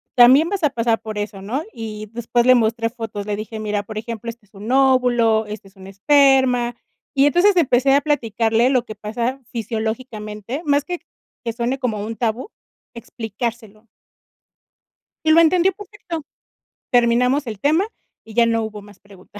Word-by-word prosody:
también 260 Hz, +6 st, +7 dB
vas 395 Hz, -3 st, -3 dB
a 300 Hz, -, +4 dB
pasar 230 Hz, -2 st, 0 dB
por 215 Hz, -1 st, -6 dB
eso", 205 Hz, -2 st, -5 dB
¿no? 250 Hz, +10 st, -3 dB
Y 215 Hz, -1 st, -7 dB
después 235 Hz, +1 st, 0 dB
le 255 Hz, 0 st, +7 dB
mostré 230 Hz, 0 st, +1 dB
fotos, 225 Hz, -4 st, -6 dB
le 210 Hz, 0 st, -2 dB
dije: 215 Hz, +1 st, -6 dB
"Mira, 210 Hz, -1 st, -2 dB
por 215 Hz, +1 st, -8 dB
ejemplo, 230 Hz, +1 st, -5 dB
este 230 Hz, -2 st, -10 dB
es 205 Hz, -, -36 dB
un 210 Hz, +4 st, -6 dB
óvulo, 250 Hz, -4 st, +3 dB
este 210 Hz, -1 st, -8 dB
es 195 Hz, -, -30 dB
un 190 Hz, 0 st, -13 dB
esperma", 255 Hz, +2 st, +3 dB, 0.4 s
y 275 Hz, 0 st, +5 dB
entonces 360 Hz, +6 st, +4 dB
empecé 270 Hz, -4 st, +3 dB
a 280 Hz, -, +4 dB
platicarle 235 Hz, -4 st, +1 dB
lo 255 Hz, -3 st, +1 dB
que 215 Hz, -, -8 dB
pasa 230 Hz, +5 st, -3 dB
fisiológicamente, 220 Hz, +1 st, -4 dB
más 285 Hz, -1 st, +2 dB
que 355 Hz, +3 st, -5 dB, 0.5 s
que 230 Hz, -, -1 dB
suene 235 Hz, +3 st, -2 dB
como 240 Hz, -6 st, -2 dB
un 225 Hz, -, -5 dB
tabú, 235 Hz, -, -2 dB, 0.4 s
explicárselo. 225 Hz, -1 st, -6 dB, 1.4 s
Y 315 Hz, -, +4 dB
lo 330 Hz, -, +7 dB
entendió 355 Hz, +3 st, +4 dB
perfecto, 385 Hz, -5 st, -8 dB, 0.7 s
terminamos 245 Hz, +3 st, +3 dB
el 215 Hz, -3 st, -6 dB
tema 315 Hz, -, +2 dB, 0.4 s
y 220 Hz, -, -13 dB
ya 235 Hz, +1 st, +4 dB
no 230 Hz, -1 st, +1 dB
hubo 215 Hz, -1 st, -6 dB
más 205 Hz, -1 st, -16 dB
preguntas. 200 Hz, 0 st, -15 dB
235 Hz, 170 wpm, -20 LUFS, 215-265 Hz, 1.4 s, también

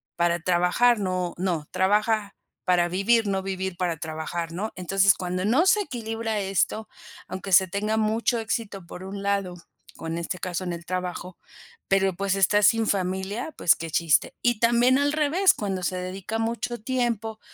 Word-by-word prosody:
para 170 Hz, 0 st, +1 dB
trabajar, 180 Hz, +7 st, +3 dB
no 185 Hz, -2 st, -2 dB
No, 170 Hz, -5 st, -2 dB
trabaja 210 Hz, +2 st, +1 dB, 0.3 s
para 175 Hz, -1 st, +3 dB
vivir, 210 Hz, +5 st, +2 dB
no 195 Hz, -1 st, -1 dB
vivir 190 Hz, -1 st, -4 dB
para 175 Hz, -3 st, -1 dB
trabajar, 160 Hz, +2 st, -4 dB
¿no? 200 Hz, +6 st, -4 dB
Entonces, 190 Hz, +2 st, +3 dB
cuando 180 Hz, +1 st, -3 dB
no 285 Hz, -, +3 dB
se 420 Hz, -, +5 dB
equilibra 225 Hz, -, -3 dB
esto, 195 Hz, +2 st, -1 dB, 0.4 s
aunque 190 Hz, +1 st, -6 dB
se 190 Hz, +1 st, +6 dB
tenga 210 Hz, +4 st, -1 dB
mucho 220 Hz, +2 st, +1 dB
éxito 215 Hz, -4 st, -4 dB
por 180 Hz, -, -9 dB
un 195 Hz, +1 st, -6 dB
lado, 200 Hz, -2 st, -1 dB, 0.4 s
con 165 Hz, +1 st, -5 dB
este 170 Hz, +2 st, -4 dB
caso 180 Hz, -1 st, -3 dB
en 180 Hz, -, -3 dB
el 170 Hz, 0 st, -7 dB
trabajo, 180 Hz, 0 st, -4 dB, 0.5 s
pero, 195 Hz, -1 st, +3 dB
pues, 195 Hz, +1 st, 0 dB
está 205 Hz, +2 st, +3 dB
sin 225 Hz, +1 st, +4 dB
familia. 190 Hz, -, -2 dB
Pues 170 Hz, -, +4 dB
qué 165 Hz, -, -6 dB
chiste, 165 Hz, -1 st, +2 dB
y 240 Hz, -3 st, +1 dB
también 240 Hz, +2 st, +4 dB
al 285 Hz, +1 st, +2 dB
revés, 315 Hz, +6 st, +3 dB
cuando 195 Hz, -3 st, -3 dB
se 185 Hz, +1 st, -1 dB
dedica 185 Hz, +4 st, -4 dB
mucho 235 Hz, +1 st, -2 dB
tiempo, 230 Hz, -3 st, -2 dB
195 Hz, 170 wpm, -25 LUFS, 180-225 Hz, 0.5 s, se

